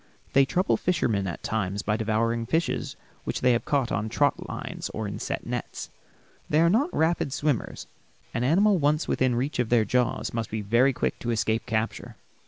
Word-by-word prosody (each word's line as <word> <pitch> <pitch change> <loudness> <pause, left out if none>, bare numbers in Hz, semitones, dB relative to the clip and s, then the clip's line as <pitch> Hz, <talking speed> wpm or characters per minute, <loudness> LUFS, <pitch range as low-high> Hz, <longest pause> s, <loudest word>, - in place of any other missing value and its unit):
They 135 0 +6
trouble 180 +7 +1
fishermen 115 - 0
at 85 - -5
times 100 -2 -2
by 105 - +1
devouring 115 +1 0
fishes 165 +6 -1 0.3
which - - -3
they 125 - +4
have 120 - -1
caught 135 -4 +1
on 110 0 -1
trot 145 +5 +1
lines - - -5
or 110 -1 -2
in 100 - -5
set - - -4
nets. - - -5 0.6
They 150 - +3
are 170 +1 +5
not 270 - +3
rapid 160 -3 +1
swimmers. 145 -2 -1 0.5
An 120 - -1
animal 190 +8 +4
once 150 +2 +1
within 130 -2 +1
reach 130 +4 -2
of 120 -2 +1
their 115 -3 +4
jaws 125 +3 0
must 115 -2 -2
be 110 0 -3
very 120 +6 +3
quick 125 - -2
to 120 - -4
escape 110 0 0
capture. 110 0 -2
120 Hz, 190 wpm, -26 LUFS, 110-150 Hz, 0.6 s, They